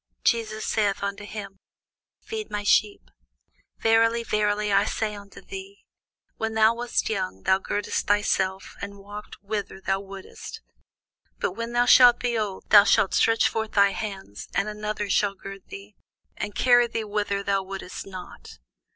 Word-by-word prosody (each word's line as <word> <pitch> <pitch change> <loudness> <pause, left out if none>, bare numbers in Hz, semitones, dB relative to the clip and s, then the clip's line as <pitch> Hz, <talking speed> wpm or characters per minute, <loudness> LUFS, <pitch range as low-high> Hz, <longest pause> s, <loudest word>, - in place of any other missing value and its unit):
Jesus 220 -2 0
saith 205 -3 0
unto 200 +1 -4
him, 205 -2 -8 0.6
Feed 435 -1 -5
my 205 0 -3
sheep. 205 0 +2 0.7
Verily, 230 +1 +3
verily, 210 -1 0
I 200 +1 +5
say 215 0 -2
unto 200 -1 -11
thee, 390 +1 -10 0.5
When 225 0 -2
thou 220 +1 +5
wast 240 +1 -1
young, 185 - -3
thou 190 - +3
girdedst 205 +1 -2
thyself, 195 -2 0
and 200 0 -6
walkedst 205 +1 -10
whither 205 -1 -4
thou 195 0 -1
wouldest: 195 - -9 0.8
but - - -1
when 230 +1 -5
thou 240 0 +3
shalt 245 -1 +8
be 245 -1 -1
old, 210 -4 -3
thou 205 -1 +10
shalt 195 - +3
stretch 225 0 +4
forth 220 -1 -3
thy 200 -1 +5
hands, 195 - -6
and 195 - +1
another 210 0 -3
shall 200 0 +1
gird 195 0 -10
thee, 200 +1 -10 0.4
and 205 -2 -5
carry 245 -1 +5
thee 230 -1 -3
whither 205 -1 -2
thou 195 -1 +1
wouldest 195 -1 -7
not. 185 - -10
210 Hz, 155 wpm, -25 LUFS, 195-225 Hz, 0.8 s, thou